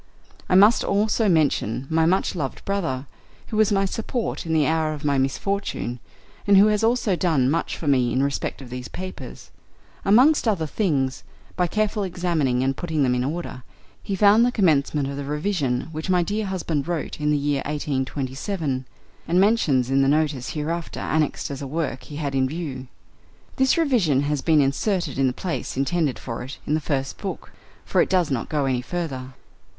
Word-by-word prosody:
I - - +3
must 205 +5 +6
also 210 +1 +1
mention 140 - +1
my 160 +1 +2
much 185 +3 +1
loved 145 -8 -4
brother, 165 -10 -2 0.4
who 215 - -3
was 215 -1 +4
my 195 -1 +2
support 225 -1 -3
in 160 - -1
the 155 -2 +3
hour 160 -1 +1
of 150 0 -9
my 140 -2 +2
misfortune, 135 -3 -2 0.5
and 200 -1 +6
who 200 - +8
has 210 +1 +1
also 225 -4 +2
done 155 -8 +2
much 165 - -1
for 160 - -6
me 130 -4 +3
in 130 - +1
respect 140 0 -2
of 125 - -12
these 125 0 -5
papers; 185 0 -8 0.5
amongst 255 +8 +5
other 190 -7 +1
things, 145 -7 -1 0.3
by 180 -1 +1
carefully 210 +1 0
examining 165 -9 0
and 135 +1 0
putting 160 -3 -1
them 125 -2 +2
in 125 0 0
order, 155 -1 -4 0.4
he 195 - -3
found 205 +3 +5
the 245 - +3
commencement 150 - +2
of 140 0 -5
the 140 - -4
revision 150 -3 -1
which 155 +2 -5
my 180 -1 +3
dear 205 +3 -2
husband 170 -6 -2
wrote 170 -3 -3
in 150 - +1
the 150 - +3
year 145 -1 0
1827, 135 0 -3 0.4
and 175 +3 +3
mentions 155 - +3
in 135 0 +4
the 135 - +3
Notice 145 -4 +1
hereafter 165 +2 -3
annexed 155 -2 -1
as 140 - -6
a 140 - -4
work 150 -2 -3
he 145 - -9
had 145 -2 -3
in 130 -1 +1
view. 145 -5 -5 0.7
This 265 +4 +3
revision 225 - +2
has 145 -1 -1
been 155 -1 +4
inserted 145 - 0
in 135 - +3
the - - +1
place 165 +1 -4
intended 145 0 0
for 115 -2 -6
it 130 +3 -7
in 150 - -1
the 155 - +1
first 135 -2 -2
book - - -6 0.3
(for - - +2
it - - +1
does 180 -5 +2
not 125 -4 -2
go 150 -3 0
any 130 -2 0
further). 130 -5 -5
155 Hz, 190 wpm, -23 LUFS, 135-190 Hz, 0.7 s, who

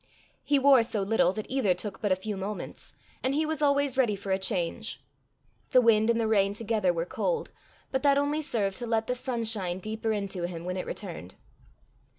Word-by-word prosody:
He 290 - +3
wore 275 -2 +6
so 220 -3 -1
little 195 -3 +3
that 215 0 -5
either 235 -9 +1
took 195 +2 -6
but 205 -3 0
a - - +5
few 205 +3 -5
moments, 195 +2 -6 0.3
and 265 +2 0
he 310 +1 +2
was 310 -1 -2
always 280 -2 +2
ready 230 -6 +3
for 195 0 -6
a 190 - +2
change. 190 +4 -2 0.7
The 255 - +6
wind 225 -1 +4
and 235 0 +3
the 225 - +1
rain 200 -2 +2
together 210 -4 +1
were 170 -1 -2
cold, 480 - -2 0.4
but 265 - 0
that 280 -1 +4
only 290 +2 +1
served 205 -9 -1
to 240 - -4
let 225 -1 +1
the 250 - -1
sunshine 225 -7 -2
deeper 220 +3 -3
into 195 -4 -2
him 170 -1 -7
when 180 0 -3
it 185 - -4
returned. 165 - -7
220 Hz, 200 wpm, -28 LUFS, 195-255 Hz, 0.7 s, wore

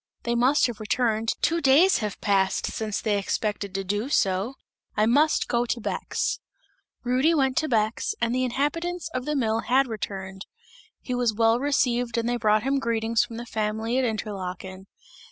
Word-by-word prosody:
"They 235 - -1
must 255 +5 +3
have 240 -4 -3
returned, 225 0 0
two 335 0 +2
days 305 +8 +5
have 210 -3 -4
passed 195 -1 +1
since 215 -2 -3
they 210 -2 0
expected 200 -1 -2
to 195 - -1
do 205 +6 -2
so. 195 0 +1 0.4
I 210 - +4
must 290 +7 +3
go 240 0 0
to 235 - -1
Bex!" - - -2 0.6
Rudy 260 +7 +2
went 265 -3 +2
to 315 -1 +1
Bex, 220 -2 0
and 235 0 0
the 255 +1 +1
inhabitants 325 +7 -2
of 255 0 -3
the 300 - -1
mill 225 -4 +1
had 265 +4 +2
returned; 195 -4 -6 0.5
he 250 - -4
was 245 -3 +1
well 225 +1 +3
received 245 -4 +1
and 230 0 0
they 245 0 0
brought 215 -1 +2
him 275 +1 +1
greetings 230 -2 +1
from 230 - -8
the 240 - -6
family 220 +2 -1
at - - +1
Interlaken. 190 -4 -4
235 Hz, 175 wpm, -25 LUFS, 210-260 Hz, 0.6 s, days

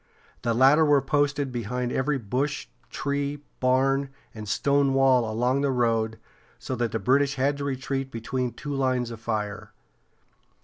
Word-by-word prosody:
The 115 -2 0
latter 135 +6 +6
were 145 -2 +5
posted 145 0 0
behind 125 +1 -3
every 135 +3 0
bush, 130 +5 -2 0.2
tree, 140 +1 -3 0.2
barn, 135 +2 +2 0.2
and 110 -2 -8
stone 140 +1 +2
wall 135 -2 +4
all 110 - -3
along 125 +5 +1
the 140 - +1
road, 115 -3 +1 0.4
so 130 - -4
that 120 -1 -1
the - - -1
British 140 +4 +2
had 135 +2 +1
to 140 - -4
retreat 135 0 -3
between 125 +1 -3
two 145 -1 -6
lines 130 -3 0
of 115 - -8
fire. 105 -3 -4
130 Hz, 160 wpm, -26 LUFS, 120-140 Hz, 0.4 s, latter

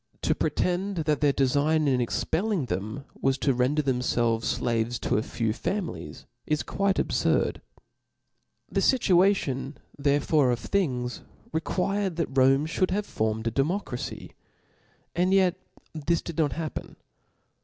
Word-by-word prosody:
To - - +3
pre - - 0
tend 190 +3 -1
that 150 -1 +1
their 145 -1 +4
defign 145 +4 +2
in 130 -2 +2
expelling 180 - 0
them 110 +7 -4 0.2
was 135 0 +2
to 135 0 +1
ren 125 +4 +1
der 150 - +1
thenifelves 120 -3 0
(laves 115 0 0
to - - +1
a - - 0
few 115 -1 -2
families, 190 - -4 0.2
is 150 -1 0
quite 195 -1 0
abfurd. - - +1 1.1
The - - -1
fituation 180 - +2 0.2
therefore 145 0 +2
of 120 - +1
things 125 -7 -1 0.3
re 160 - +1
quired 195 +1 -1
that 160 -5 -3
Rome 135 +2 +4
ftiould 180 +3 0
have 200 +2 -1
formed 110 - -2
a 115 - 0
democra 140 - -1
fy^ - - -7 0.8
and 180 +3 +2
yet 185 -2 +4 0.4
this 165 +2 0
did 170 -1 -6
not 150 -3 +2
happen. 160 -2 -5
145 Hz, 145 wpm, -27 LUFS, 125-180 Hz, 1.1 s, their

